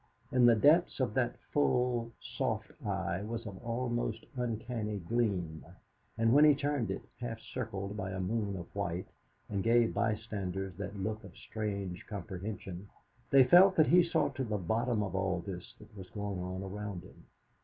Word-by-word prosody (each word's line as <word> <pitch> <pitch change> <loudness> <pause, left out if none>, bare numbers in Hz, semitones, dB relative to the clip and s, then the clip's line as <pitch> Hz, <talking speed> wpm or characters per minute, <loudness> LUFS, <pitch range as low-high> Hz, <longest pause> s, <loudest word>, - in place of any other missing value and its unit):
In 125 -1 +6
the 120 - +7
depths 150 +11 +4
of 125 -5 +1
that 125 -1 +1 0.2
full, 125 -4 +2
soft - - -3
eye 95 -2 -1
was 115 +2 -4
an 100 -3 -7
almost 120 0 -2
uncanny 115 -3 -2
gleam, 95 -5 -1 0.5
and 115 0 +3
when 145 +2 +7
he 150 -2 +7
turned 140 -6 -1
it, 95 - -3 0.2
half 115 -2 -4
circled 105 -5 -5
by 95 -3 -3
a 95 0 -4
moon 100 +1 -1
of 85 - -6
white, 90 -3 -2 0.4
and 100 -2 -1
gave 115 0 +4
bystanders 95 -3 -2
that 100 0 -5
look 110 +3 -3
of - - -12
strange 100 -4 -4
comprehension, 100 -2 -6 0.4
they 135 -1 +8
felt 185 +8 +7
that 155 - +5
he 180 +1 +7
saw 170 - +1
to 135 - -3
the 105 -4 -1
bottom 110 +4 0
of 100 - -4
all 95 -2 0
this 90 -3 -7
that 110 - -16
was 95 -2 -9
going 100 -3 -4
on 90 +1 -4
around 100 -1 -5
him. - - -16
105 Hz, 170 wpm, -32 LUFS, 95-120 Hz, 0.5 s, they